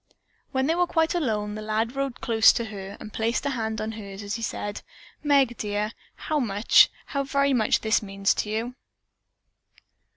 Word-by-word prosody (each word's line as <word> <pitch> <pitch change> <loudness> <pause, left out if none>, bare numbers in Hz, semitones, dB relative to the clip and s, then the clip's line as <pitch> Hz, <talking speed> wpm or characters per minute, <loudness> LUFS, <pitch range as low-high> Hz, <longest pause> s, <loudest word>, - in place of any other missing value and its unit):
When 265 -1 +1
they 320 - +2
were 355 +1 +2
quite 325 -1 +1
alone 215 -11 -1
the 215 - -6
lad 220 +3 -1
rode 275 -2 -3
close 225 -2 +6
to 235 - -2
her, 200 -2 -8
and 215 - -10
placed 230 +4 -1
a 280 - +1
hand 220 -3 -2
on 215 +1 -3
hers 205 -2 -8
as 200 0 -4
he 230 - -3
said, 205 -2 -4 0.4
"Meg, 275 -5 +3
dear, 210 +1 -2 0.2
how 305 -1 -2
much, 210 -4 +5 0.2
how 280 - -2
very 280 0 +1
much 220 -4 +2
this 220 +1 +2
means 195 -1 0
to 210 - -3
you." 230 +4 -3
225 Hz, 185 wpm, -25 LUFS, 210-270 Hz, 0.4 s, close